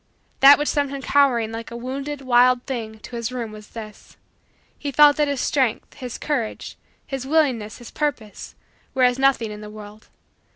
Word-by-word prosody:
That 275 +1 +9
which 295 - -2
sent 285 -1 0
him 275 0 -6
cowering 250 -6 +2
like 225 0 -6
a 235 - -7
wounded, 275 +4 -5
wild 250 -1 +4
thing 225 -4 -5
to 245 - -9
his 235 0 -3
room 240 -3 -5
was 215 -1 -11
this: 215 -2 -11 0.6
he 285 - -4
felt 295 +1 +6
that 300 -1 +2
his 280 -2 -2
strength, 260 -5 0
his 250 -2 -7
courage, 260 -8 -3 0.3
his 270 -1 -5
willingness, 265 -9 +1
his 240 - -12
purpose, 260 -9 -4 0.4
were 260 - +2
as 250 +1 +3
nothing 265 -5 +2
in 210 0 -8
the 210 - -9
world. 210 0 -12
250 Hz, 180 wpm, -22 LUFS, 225-280 Hz, 0.6 s, That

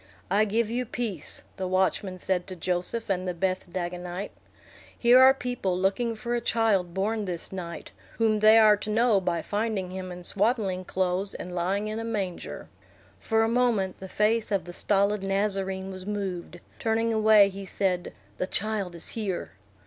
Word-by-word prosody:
"I 210 +2 +4
give 220 +1 0
you 245 +2 0
peace," 215 -10 -4
the 185 - -2
watchman 185 0 0
said 180 0 -1
to 185 - -6
Joseph 180 +6 -2
and 185 -1 -1
the 180 - -2
Beth 185 0 -1
Dagonite. 180 +2 -4 0.7
"Here 245 +1 +6
are 260 +1 +9
people 245 -8 -2
looking 210 +5 0
for 235 +2 -4
a 240 - 0
child 210 -7 +1
born 210 +2 0
this 175 -3 -4
night, 175 -3 -7 0.3
whom 220 -2 +2
they 215 +1 +7
are 215 -1 +7
to 205 - -6
know 220 -2 +3
by 170 -3 -1
finding 205 -3 -2
him 185 -1 -6
in 180 0 -8
swaddling 200 -2 0
clothes 185 +2 -1
and 180 - -7
lying 190 +4 -1
in 215 +1 -3
a - - -4
manger." 200 -6 -4 0.5
For 225 -1 +1
a - - +2
moment 230 -6 +1
the 190 - -8
face 215 +3 +1
of 200 -2 0
the 175 - -8
stolid 200 +1 +1
Nazarene 195 -1 -1
was 185 0 -9
moved; 185 -4 -4 0.2
turning 225 0 +1
away, 215 -2 +6
he 195 0 -8
said, 185 -2 -1 0.3
"The 185 - -1
child 200 -4 -1
is 170 - -1
here." 205 -6 -3
195 Hz, 175 wpm, -27 LUFS, 185-220 Hz, 0.7 s, are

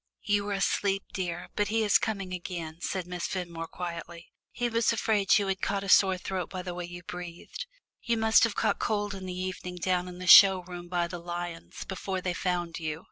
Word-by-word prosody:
"You 205 -1 +1
were 205 - -2
asleep, 195 0 +1
dear, 175 -2 -3
but 205 - +1
he 225 +2 +1
is 205 -1 +5
coming 195 -4 -3
again," 170 -2 -6
said 185 -2 -2
Miss 180 -1 -4
Fenmore 170 -3 -4
quietly. 170 -1 -7 0.2
"He 245 - -2
was 230 -1 +2
afraid 215 -3 +3
you 205 - +1
had 195 -1 -2
got 200 -1 -1
a 195 - -5
sore 190 0 +6
throat 185 -1 -4
by 185 -1 -5
the 180 -1 -5
way 175 0 -5
you 175 0 -9
breathed. 175 - -7 0.3
You 235 -1 0
must 220 0 +5
have 230 -3 +2
caught - - +1
cold 205 -2 -1
in 190 -1 -7
the 180 0 -5
evening 185 -1 -4
down 180 +1 0
in 180 -1 -8
the 185 - -6
show 190 0 +9
room 175 -1 -8
by 175 -1 0
the 175 0 -6
lions, 175 0 -6
before 190 0 -3
they 180 -1 -2
found 175 -2 -2
you." 155 -1 -3
185 Hz, 215 wpm, -29 LUFS, 175-200 Hz, 0.3 s, show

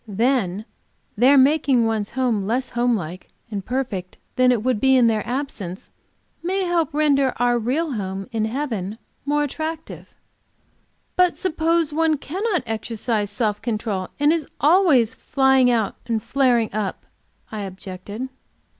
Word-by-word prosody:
Then, 215 -2 0 0.5
their 255 +6 +5
making 270 -3 +4
one's 220 -2 -1
home 230 -7 +1
less 250 +4 0
home 240 0 +1
like 180 -2 -6 0.2
and 200 -2 -3
perfect 215 -7 -3 0.2
than 255 0 +4
it 230 -4 0
would 255 -3 +1
be 265 +2 +4
in 250 -2 +5
their 220 -2 +2
absence, 240 -9 -5 0.5
may 380 +3 -1
help 345 -4 +1
to 295 - -6
render 280 -4 +3
our 245 0 +2
real 280 +8 -1
home 195 -4 -4
in 220 -2 0
heaven 220 -5 -3 0.3
more 295 +1 +1
attractive." 315 +3 -6 1.0
"But 360 -1 +3
suppose 330 -3 +1
one 320 0 +2
cannot 365 +6 -2
exercise 220 -1 -2
self 210 0 -1
control, 215 -5 -2
and 295 +2 +4
is 325 -4 -2
always 295 - +4
flying 265 -1 +3
out 225 -4 0
and 225 -3 -1
flaring 245 -6 +2
up?" 205 -3 -3 0.5
I 215 - -5
objected. 195 +5 -7
245 Hz, 145 wpm, -22 LUFS, 215-290 Hz, 1.0 s, their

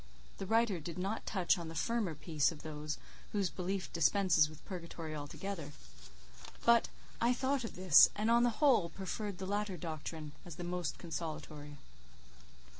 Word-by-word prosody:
The 195 - -4
writer 225 -3 +3
did 165 +3 -6
not 195 +4 -3
touch 185 -2 +2
on 170 - -5
the 165 - -7
firmer 215 -2 0
peace 150 -1 +1
of 155 - -10
those 150 0 -4 0.4
whose 200 -4 +1
belief 190 +1 -3
dispenses 165 -2 +4
with 155 0 -14
purgatory 170 -3 -6
altogether: 150 +1 -5 0.9
but 235 -1 +6 0.3
I 240 +2 +4
thought 265 +1 0
of 225 - -6
this; 180 -4 +8
and, 215 +2 +1
on 235 0 +6
the 240 - +4 0.2
whole, 230 -11 +5
preferred 195 +2 -4
the 190 - -5
latter 205 -1 -1
doctrine 155 -1 -5
as 175 -3 -9
the 175 - -6
most 175 -4 -2
consolatory. 155 -3 -6
180 Hz, 160 wpm, -34 LUFS, 155-205 Hz, 0.9 s, this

